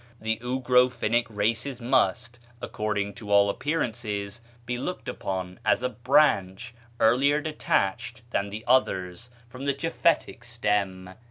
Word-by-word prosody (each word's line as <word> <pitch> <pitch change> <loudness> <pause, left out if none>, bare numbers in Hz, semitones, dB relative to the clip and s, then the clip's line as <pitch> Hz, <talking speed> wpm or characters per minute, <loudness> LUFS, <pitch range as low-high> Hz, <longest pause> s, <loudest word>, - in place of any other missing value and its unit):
the 110 0 -1
Ugro 125 0 +3
Finnish 120 0 0
races 115 +5 -1
must, 120 -1 +1 0.2
according 105 -3 -2
to 105 +1 -10
all 100 0 +5
appearances, 110 -7 -3 0.2
be 125 - -2
looked 155 +9 -5
upon 95 -1 -4
as - - +2
a 125 - +1
branch, 120 -4 +2 0.3
earlier 135 +6 +4
detached 120 -6 -1
than 100 -3 -1
the 105 +2 -7
others 110 -4 +1 0.2
from 125 +3 -9
the 140 -1 +1
Japhetic 165 -4 0
stem." 105 -6 -1
115 Hz, 125 wpm, -26 LUFS, 100-125 Hz, 0.3 s, all